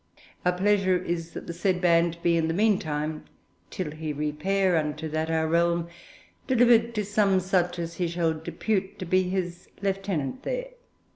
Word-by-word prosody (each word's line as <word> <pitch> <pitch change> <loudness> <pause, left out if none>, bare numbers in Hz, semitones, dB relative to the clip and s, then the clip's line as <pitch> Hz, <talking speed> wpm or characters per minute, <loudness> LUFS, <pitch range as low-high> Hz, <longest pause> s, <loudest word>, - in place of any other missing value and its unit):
Our 180 - +3
pleasure 190 0 +2
is 170 -2 -3
that - - -7
the 170 - -5
said 180 +1 0
band 170 -1 +3
be, 170 -1 +3
in 165 -1 +1
the 165 - -1
meantime, 155 -7 0 0.4
till 180 -5 -4
he 155 0 -4
repair 170 +6 0
into 155 0 -1
that 155 +1 -2
Our 160 0 +1
realm, 170 +1 +1 0.6
delivered 235 -2 +4
to 210 -1 -1
some 200 -2 +3
such 180 -1 0
as 170 0 -5
he 180 - 0
shall 165 -1 0
depute 190 +5 -2
to 185 - -5
be 185 +2 +3
his 180 -2 -3
lieutenant 195 - -2
there. - - -3
175 Hz, 165 wpm, -26 LUFS, 165-195 Hz, 0.6 s, delivered